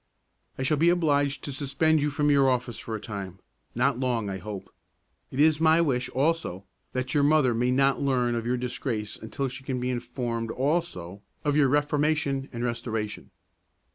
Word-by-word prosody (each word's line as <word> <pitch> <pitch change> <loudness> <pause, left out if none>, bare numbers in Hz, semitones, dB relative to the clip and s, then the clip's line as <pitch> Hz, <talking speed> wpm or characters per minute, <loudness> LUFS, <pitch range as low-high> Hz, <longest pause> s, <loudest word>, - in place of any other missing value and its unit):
"I 130 - -2
shall 150 +3 +2
be 165 +4 +4
obliged 145 -5 +1
to 145 - -4
suspend 145 +3 +1
you 150 - +1
from 145 +1 +1
your 140 -2 +5
office 125 -2 -1
for 110 - -5
a - - -4
time; 100 -4 -6 0.4
not 125 +1 +1
long, 120 -6 0
I 95 - -4
hope. 100 +1 -8 0.6
It 130 - -6
is 155 +1 +4
my 160 0 +5
wish, 130 -7 +1
also, 135 - -1 0.3
that 130 0 -2
your 145 - +3
mother 145 -3 +4
may 120 +2 +1
not 135 +1 +2
learn 125 -3 +1
of 115 -1 -1
your 125 +2 0
disgrace 120 -3 -3
until 135 +5 -4
she 130 +1 -8
can 130 -2 -2
be 125 +1 -1
informed 120 -2 -3
also 125 - -2 0.2
of 145 -1 +2
your 150 -2 +5
reformation 145 -1 +1
and 120 -1 -4
restoration." 115 -3 -3
130 Hz, 180 wpm, -27 LUFS, 120-145 Hz, 0.6 s, your